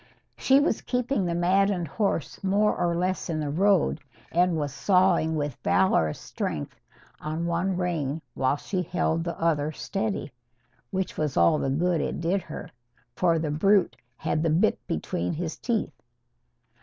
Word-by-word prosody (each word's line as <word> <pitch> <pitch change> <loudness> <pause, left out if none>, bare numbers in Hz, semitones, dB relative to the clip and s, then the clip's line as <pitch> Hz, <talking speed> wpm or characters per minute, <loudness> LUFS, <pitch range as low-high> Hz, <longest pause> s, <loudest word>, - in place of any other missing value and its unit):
She 270 +1 +4
was 285 -6 +1
keeping 250 -4 -1
the 170 -1 -1
maddened 185 0 +2
horse 200 -1 -2
more 205 +2 +2
or 175 -1 0
less 185 +2 -1
in 160 -2 -1
the 150 -2 -2
road, 185 -2 +2 0.3
and 175 0 +2
was 145 -3 -2
sawing 180 -3 +3
with 145 -4 -3
valorous 80 - +2
strength 75 - -5 0.4
on 155 +2 -3
one 175 +2 0
rein 165 -5 -1
while 130 +1 +1
she 185 +5 -3
held 165 -1 0
the 170 0 -5
other 155 -2 +1
steady. 195 -1 -3 0.6
Which 190 0 -3
was 150 -3 -1
all 85 0 +4
the 135 - -1
good 170 +5 +1
it - - -3
did 175 +4 0
her. 155 - -8 0.4
For 170 +2 +2
the 155 -2 -1
brute 195 +5 +3 0.2
had 155 -1 -1
the 165 - +1
bit 175 +8 +2
between 85 +2 -2
his 165 0 -3
teeth. 235 -4 -2
170 Hz, 155 wpm, -26 LUFS, 155-190 Hz, 0.6 s, She